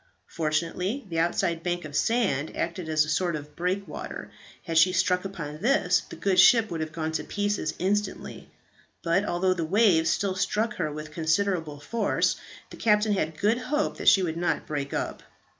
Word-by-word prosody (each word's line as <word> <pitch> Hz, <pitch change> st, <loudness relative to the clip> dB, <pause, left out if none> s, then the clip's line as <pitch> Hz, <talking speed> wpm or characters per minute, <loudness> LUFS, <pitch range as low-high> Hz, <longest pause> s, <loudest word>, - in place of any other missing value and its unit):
Fortunately, 170 Hz, -, -2 dB
the 165 Hz, -1 st, -1 dB
outside 170 Hz, 0 st, 0 dB
bank 175 Hz, -1 st, -2 dB
of 145 Hz, -1 st, -8 dB
sand 195 Hz, -, 0 dB
acted 170 Hz, -1 st, -3 dB
as 155 Hz, -1 st, +3 dB
a -, -, -10 dB
sort 170 Hz, +1 st, 0 dB
of 150 Hz, 0 st, -8 dB
breakwater; 180 Hz, -1 st, -4 dB, 0.3 s
had 165 Hz, -1 st, +2 dB
she 185 Hz, +3 st, +5 dB
struck 180 Hz, 0 st, +1 dB
upon 155 Hz, -6 st, -6 dB
this, 275 Hz, +6 st, +3 dB
the -, -, -8 dB
good 190 Hz, -2 st, +1 dB
ship 225 Hz, 0 st, +6 dB
would 165 Hz, -2 st, -3 dB
have 155 Hz, 0 st, -4 dB
gone 160 Hz, 0 st, -3 dB
to 160 Hz, -, -2 dB
pieces 205 Hz, -6 st, -2 dB
instantly; 200 Hz, +2 st, -2 dB, 0.5 s
but 175 Hz, +4 st, +2 dB
although 185 Hz, 0 st, +1 dB
the 175 Hz, -2 st, -3 dB
waves 170 Hz, -2 st, +3 dB
still 195 Hz, +2 st, 0 dB
struck 210 Hz, +4 st, -1 dB
her 155 Hz, -4 st, -1 dB
with 150 Hz, +1 st, -7 dB
considerable 160 Hz, -1 st, -1 dB
force, 215 Hz, +8 st, 0 dB, 0.3 s
the -, -, -10 dB
captain 210 Hz, -1 st, +3 dB
had 160 Hz, -5 st, -2 dB
good 215 Hz, +6 st, +2 dB
hope 295 Hz, +4 st, -1 dB
that -, -, +5 dB
she 190 Hz, -, +5 dB
would 165 Hz, -2 st, -2 dB
not 175 Hz, -, -1 dB
break 140 Hz, -2 st, -4 dB
up. -, -, -3 dB
175 Hz, 180 wpm, -26 LUFS, 160-200 Hz, 0.5 s, ship